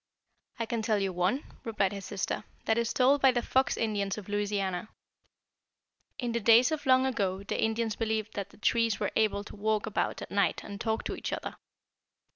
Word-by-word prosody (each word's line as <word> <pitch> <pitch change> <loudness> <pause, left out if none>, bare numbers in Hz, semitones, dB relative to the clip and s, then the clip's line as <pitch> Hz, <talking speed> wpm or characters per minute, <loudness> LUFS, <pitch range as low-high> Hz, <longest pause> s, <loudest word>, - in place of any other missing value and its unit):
"I 230 - -1
can 225 0 -2
tell 215 -1 +1
you 195 -2 -1
one," 185 +11 +1 0.2
replied 210 -4 0
his 200 -2 -6
sister, 200 +1 -3 0.2
"that 220 +1 +2
is 235 -1 0
told 270 +2 +4
by 270 - +7
the 240 -1 -1
Fox 265 0 +2
Indians 205 -3 -1
of 210 - -8
Louisiana. 205 -2 -1 1.3
In 245 -2 -2
the 235 - 0
days 235 +5 +6
of 300 -3 -3
long 260 0 +5
ago 200 -7 -1
the - - -2
Indians 220 -1 0
believed 220 -1 -2
that 200 -1 -4
the - - -19
trees 230 0 +1
were - - -1
able 210 -2 +2
to 210 - -11
walk 215 0 0
about 215 - -2
at - - -10
night 200 0 +1
and 200 0 -7
talk 220 -1 -1
to - - -3
each - - -5
other. - - -4
220 Hz, 200 wpm, -30 LUFS, 200-235 Hz, 1.3 s, by